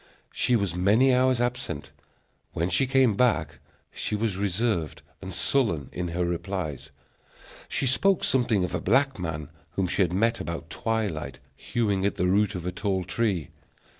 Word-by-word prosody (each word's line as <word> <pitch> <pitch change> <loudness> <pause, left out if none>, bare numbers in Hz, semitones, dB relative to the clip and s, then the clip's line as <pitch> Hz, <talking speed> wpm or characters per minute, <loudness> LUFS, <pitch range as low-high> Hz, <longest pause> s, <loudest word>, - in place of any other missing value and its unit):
She 125 - +2
was 100 -6 0
many 110 +9 +4
hours 130 0 +3
absent. 120 - -2 0.6
When 85 +3 -1
she 135 - +2
came 130 -5 +3
back, 125 +2 +1 0.3
she - - -3
was 105 -2 -1
reserved 100 - -1 0.2
and 95 -1 -6
sullen 95 - 0
in 90 0 -3
her 85 +1 -1
replies. 85 -4 -3 0.8
She - - -1
spoke 190 +9 +3
something 120 -7 +2
of 90 - -3
a 90 - -1
black 135 +5 +2
man, 80 -4 -4 0.2
whom 95 - 0
she 95 - 0
had 90 -3 +2
met 115 +6 +1
about 85 -1 -5
twilight 110 -9 -2 0.2
hewing 105 -5 -1
at 100 - +1
the 90 - 0
root 100 +2 +2
of 90 -1 -5
a 90 - -1
tall 95 0 -1
tree. 90 -3 -1
100 Hz, 165 wpm, -26 LUFS, 90-120 Hz, 0.8 s, many